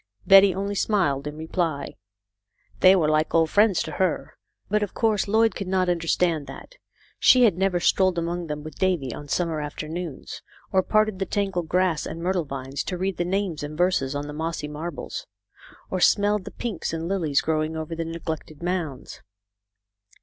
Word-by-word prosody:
Betty 195 0 +8
only 200 +1 -2
smiled 175 -9 0
in 150 +1 -6
reply. 160 -3 -2 0.9
They 185 +1 +7
were 165 -5 +2
like 155 +1 +1
old 160 -1 +3
friends 205 -3 +4
to - - -6
her, 185 -3 -1 0.3
but 210 +1 +1
of 205 - -3
course 215 -3 +1
Lloyd 220 +2 +3
could 195 - -5
not 185 -1 +1
understand 165 -3 0
that. 135 - -10 0.5
She 255 -1 +6
had 210 -7 +5
never 190 -1 +1
strolled 185 +1 +2
among 170 0 -2
them 150 -1 -5
with 155 -1 -10
Davy 175 -10 0
on 145 - -8
summer 160 +1 -1
afternoons, 155 +1 -6 0.3
or 190 - +4
parted 215 0 +1
the 195 - -2
tangled 190 -5 -2
grass 180 -3 +1
and 165 - -6
myrtle 180 -1 0
vines 135 0 -5
to 180 - -3
read 190 0 -2
the 175 - 0
names 190 -3 -1
and 150 +1 -6
verses 175 -6 +1
on 145 0 -3
the 150 - -7
mossy 160 0 -3
marbles, 150 +1 -6 0.6
or 185 - -1
smelled 205 +1 +3
the - - -7
pinks 215 -9 -4
and 165 0 -3
lilies 170 -7 +1
grow 155 -1 0
ing 160 +1 -4
over 160 +1 -5
the 165 - -2
neglected 160 -1 -6
mounds. 170 -7 -4
175 Hz, 180 wpm, -24 LUFS, 155-190 Hz, 0.9 s, Betty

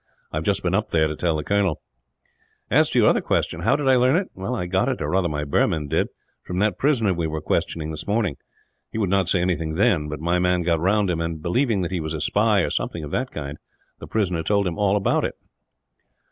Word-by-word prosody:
I - - -3
have 80 - -2
just 100 +2 0
been 90 0 0
up 105 +3 0
there 80 -1 +2
to 75 - -4
tell 85 0 0
the 75 - -3
colonel. 100 -4 +1 0.9
"As - - +4
to - - -1
your - - +5
other - - +3
question - - -1
how 110 +10 +2
did 145 -2 -2
I 130 -1 +5
learn 130 +3 +4
it 185 +2 -1
I 95 +1 -3
got 95 +8 +1
it, 130 - -2
or 75 0 -2
rather 90 -2 +1
my 75 -1 -2
Burman 75 +1 0
did, - - +1 0.3
from 90 - -6
that 105 +2 +1
prisoner 120 -9 +2
we 85 -2 -2
were 80 0 -3
questioning 80 +1 -2
this 75 -1 -7
morning. 105 -6 0 0.5
He - - -6
would 100 -4 0
not 95 -3 +2
say 90 - +2
anything 80 -3 -1
then; 90 -6 +2
but 75 -1 -5
my 85 +3 +1
man 90 0 +2
got 85 -1 +1
round 95 +2 +2
him 85 -1 -2
and, 85 -1 -3
believing 105 - +1
that 85 - -3
he 90 - -1
was 80 0 -3
a - - -4
spy, 105 +5 +2
or - - -1
something 85 - -3
of 75 - -7
that 125 +1 -1
kind, 70 - -6 0.4
the - - -9
prisoner 90 -6 0
told 100 +4 +1
him 90 0 -3
all 100 -1 +3
about 100 - +1
it." - - -2
90 Hz, 245 wpm, -23 LUFS, 80-105 Hz, 0.9 s, your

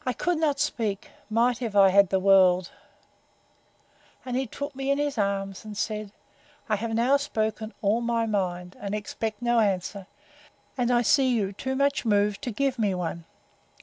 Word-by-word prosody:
I 255 - -1
could 350 +5 -1
not 295 -3 +1
speak, 220 -8 -2 0.2
might 235 +3 +1
I - - -1
have 200 -3 +5
had 200 -2 +5
the 190 - +2
world; 185 -2 +4 1.5
and 250 -1 -3
he 260 0 -1
took 285 +4 -6
me 270 0 -3
in 280 - +2
his 290 -1 -1
arms, 195 -2 -2
and 210 -1 -8
said, 210 -1 -3 0.6
I 215 - +1
have 225 +2 -3
now 250 +5 +3
spoken 220 -5 -3
all 210 +4 +2
my 235 -1 0
mind, 180 -4 -2
and 205 0 -3
expect 215 +2 -4
no 240 -1 +3
answer; 195 -2 -1 0.7
and 245 -2 0
I 245 -1 +3
see 265 +2 +4
you 205 -5 0
too 265 +6 -4
much 280 +1 +1
moved 205 -2 +1
to 245 - -2
give 265 +2 -1
me 205 -4 +1
one. 170 -1 -4
220 Hz, 180 wpm, -26 LUFS, 200-250 Hz, 1.5 s, have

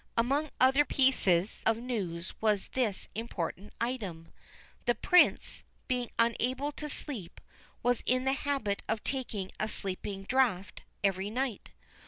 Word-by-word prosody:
Among 275 +6 +2
other 265 +3 +6
pieces 215 -11 +3
of 225 0 +3
news 195 -8 -3
was 210 -3 +2
this 235 -7 -1
important 205 -3 -4
item: 205 -10 -3 0.6
the 240 - +3
Prince, 360 - +4 0.3
being 250 -2 -1
unable 255 +5 +1
to 300 +1 -6
sleep, 240 - -4 0.4
was 245 0 +2
in 255 +1 +3
the 265 0 +2
habit 275 -8 -1
of 220 -1 -1
taking 230 -8 -3
a 215 - 0
sleeping 195 -1 -3
draught 225 -5 +1 0.2
every 195 0 +1
night. 245 0 -2
230 Hz, 130 wpm, -31 LUFS, 200-260 Hz, 0.6 s, other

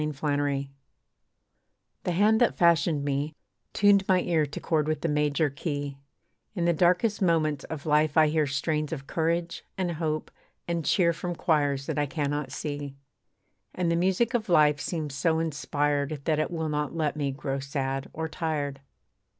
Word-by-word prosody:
LIFE'S 150 -2 -4
KEY 145 -2 -1 1.3
The - - +1
hand 215 +5 +3
that 240 - +3
fashioned 165 -3 +3
me, 145 +2 -1 0.4
tuned 205 -1 +4
my 185 -1 +4
ear 160 -4 +1
To 140 - -6
chord 155 -2 0
with 155 0 -1
the - - 0
major 150 +1 +1
key, 145 -1 -4 0.6
In 175 -3 0
the 170 - +3
darkest 180 +6 +2
moments 155 -5 +1
of 155 -3 -7
life 150 0 +2
I 155 -1 +6
hear 155 -1 +1
Strains 150 +2 -1
of 140 -4 -5
courage, 170 +2 -1
and 185 -2 -1
hope, 155 -1 -2 0.4
and 170 -1 -1
cheer 170 +1 +3
From 175 +2 -4
choirs 145 -5 +1
that - - -2
I 145 - +1
cannot 145 -2 -2
see. 145 -1 -5 0.8
And 175 -2 0
the - - +2
music 190 +7 +1
of 225 -4 -1
life 150 -3 +5
seems 155 -5 -3
so 160 +3 +1
inspired 145 -2 -1
That 155 -2 +1
it 155 - 0
will 160 -2 -3
not 150 +1 -2
let 155 -3 0
me 145 -2 -1
grow 135 0 -3
sad 135 -1 -3
or 160 0 -3
tired. 150 -4 -3
155 Hz, 170 wpm, -27 LUFS, 145-170 Hz, 1.3 s, I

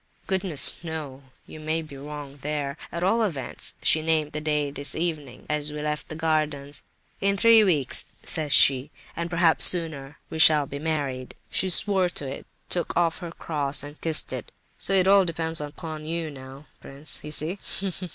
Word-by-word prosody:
"Goodness 185 -6 +3
knows—you 145 -3 -9
may 155 +1 -2
be 150 -3 -12
wrong 145 0 -9
there! 145 -1 -4 0.2
At 170 +1 -4
all 220 +5 +2
events, 165 -12 -1
she 160 - +3
named 155 -1 0
the 150 - -4
day 150 -2 -1
this 140 0 0
evening, 155 -6 -4
as 150 0 -1
we 150 - -6
left 150 0 -4
the 155 - -6
gardens. 155 -3 -1 0.4
'In 200 0 +1
three 230 0 +6
weeks,' 150 -10 +4 0.2
says 155 -3 -1
she, 135 +1 +5 0.3
'and 170 0 -4
perhaps 170 -1 +3
sooner, 155 -5 +3
we 160 - -5
shall 150 -2 +7
be 140 +1 -7
married.' 140 -5 -3 0.2
She 190 - +2
swore 190 0 +2
to 145 -5 -4
it, 135 - -8 0.2
took 175 - -2
off 170 -2 +1
her 175 - -7
cross 145 -4 0
and 145 +1 -11
kissed 160 -2 +2
it. - - -7 0.3
So - - 0
it 190 -1 +3
all 200 0 +6
depends 165 -2 -2
upon 155 +1 -7
you 165 -1 -3
now, 135 +1 -12
prince, 140 +3 -3
You 150 - -7
see! 155 +6 0
155 Hz, 175 wpm, -25 LUFS, 145-170 Hz, 0.4 s, shall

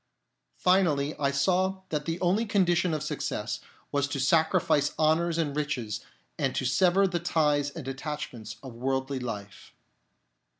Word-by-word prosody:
Finally, 160 -6 +2
I 140 - +2
saw 185 +7 +1
that 150 -2 -2
the 165 +1 -2
only 195 +6 +2
condition 180 -3 +2
of 150 - -3
success 155 - -3 0.3
was 140 -1 +1
to 140 -1 -3
sacrifice 145 0 +2
honours 160 +2 +2
and 150 -4 -1
riches 125 -8 -2 0.4
and 135 -4 0
to 130 - -1
sever 185 +8 +4
the 175 -2 0
ties 150 -4 +2
and 145 -2 -8
attachments 135 -4 -5
of 130 -3 -8
worldly 130 +2 -1
life. 105 -5 -7
150 Hz, 140 wpm, -28 LUFS, 135-175 Hz, 0.4 s, sever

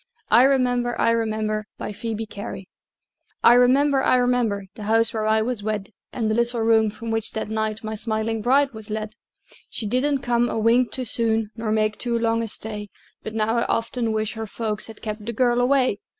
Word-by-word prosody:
I 245 - +7
REMEMBER, 245 -3 +1
I 230 - +3
REMEMBER 215 -2 -1
BY - - -5
PHOEBE 225 +1 -4
CARY 200 -2 -7 0.8
I 235 - +8
remember, 265 +3 +4
I 255 - +3
remember, 245 -5 +1
The - - -11
house 225 +1 +3
where 215 -1 -1
I 220 0 +3
was 240 -2 -2
wed, 210 -1 -3 0.2
And 225 -3 -2
the 215 - +1
little 235 +1 0
room 225 -1 +4
from 225 +2 -6
which 225 -1 -1
that 220 -1 -4
night, 220 0 -2
My 220 0 -4
smiling 220 0 -2
bride 270 +4 +3
was 220 -1 -9
led. 215 0 -4 0.6
She 225 - -4
didn't 260 +5 0
come 240 0 +1
a - - -2
wink 230 +3 +3
too 255 - -4
soon, 225 -1 +1
Nor 225 -1 -3
make 215 -1 0
too 240 -1 0
long 230 0 +1
a 230 - -3
stay; 210 -1 -6 0.3
But 220 - -7
now 225 +1 +1
I 235 - +1
often 230 0 -1
wish 215 -1 -1
her 220 -1 -5
folks 215 -1 -3
Had 220 -1 -12
kept 215 -1 -5
the 235 - -2
girl 245 +1 +2
away! 255 -4 +2
225 Hz, 205 wpm, -23 LUFS, 215-240 Hz, 0.8 s, I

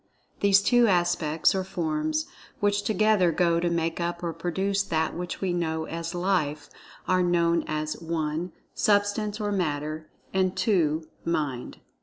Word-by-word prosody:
These 200 0 +5
two 245 +1 +5
aspects 175 -4 +2
or 190 -1 -1
forms, 155 -4 -1 0.3
which 205 0 +2
together 210 -3 +3
go 170 0 +2
to 175 0 +1
make 165 0 -1
up 170 0 -3
or 170 -1 -2
produce 190 +4 -1
that 160 -5 -1
which 175 +1 -5
we 185 -2 0
know 160 -2 -1
as 165 +2 -5
"Life," 175 -5 -1 0.4
are 185 0 +3
known 170 -1 +2
as 155 +1 -3
(1) 165 +1 -2 0.2
Substance 205 +1 +1
or 205 -1 -1
Matter; 155 -4 -2 0.2
and 190 -1 +1
(2) 160 -6 +1 0.2
Mind. 145 -7 -3
175 Hz, 145 wpm, -26 LUFS, 160-195 Hz, 0.4 s, These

